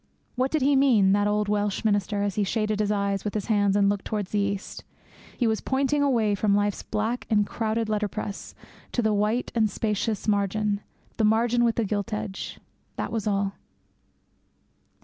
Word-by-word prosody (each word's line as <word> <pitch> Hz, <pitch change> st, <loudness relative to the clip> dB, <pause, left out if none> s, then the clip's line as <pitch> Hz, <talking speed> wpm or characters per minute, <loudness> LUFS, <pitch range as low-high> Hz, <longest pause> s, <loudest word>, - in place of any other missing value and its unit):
What 260 Hz, +1 st, +1 dB
did 310 Hz, -2 st, 0 dB
he 280 Hz, +1 st, +4 dB
mean, 240 Hz, -8 st, +4 dB
that 205 Hz, +1 st, +3 dB
old 210 Hz, 0 st, +1 dB
Welsh 205 Hz, +1 st, -1 dB
minister, 205 Hz, -1 st, +1 dB
as 200 Hz, -1 st, -1 dB
he 210 Hz, -, 0 dB
shaded 215 Hz, +1 st, -1 dB
his 210 Hz, -1 st, +1 dB
eyes 200 Hz, -1 st, 0 dB
with 210 Hz, -, -4 dB
his 210 Hz, -, -1 dB
hands 205 Hz, -3 st, +2 dB
and 200 Hz, -1 st, +4 dB
looked 200 Hz, 0 st, 0 dB
towards 205 Hz, -3 st, -3 dB
the 210 Hz, -, +1 dB
East? 200 Hz, 0 st, -3 dB, 0.5 s
He 245 Hz, -, +1 dB
was 220 Hz, -1 st, +1 dB
pointing 275 Hz, +2 st, +1 dB
away 235 Hz, -7 st, +2 dB
from 200 Hz, 0 st, +2 dB
life's 205 Hz, 0 st, 0 dB
black 220 Hz, +4 st, -2 dB
and 210 Hz, -2 st, +3 dB
crowded 225 Hz, +1 st, -2 dB
letterpress 210 Hz, -1 st, -3 dB, 0.4 s
to 240 Hz, -, +1 dB
the 220 Hz, -1 st, +2 dB
white 210 Hz, +4 st, 0 dB
and 220 Hz, -2 st, +2 dB
spacious 215 Hz, +1 st, -2 dB
margin 205 Hz, 0 st, +1 dB, 0.4 s
the 225 Hz, -, +1 dB
margin 230 Hz, +3 st, +3 dB
with 230 Hz, -1 st, +2 dB
the 230 Hz, -, 0 dB
gilt 205 Hz, +2 st, -2 dB
edge 205 Hz, -2 st, -5 dB, 0.4 s
that -, -, -3 dB
was 220 Hz, -2 st, -2 dB
all. 200 Hz, -1 st, 0 dB
210 Hz, 185 wpm, -26 LUFS, 205-225 Hz, 0.5 s, he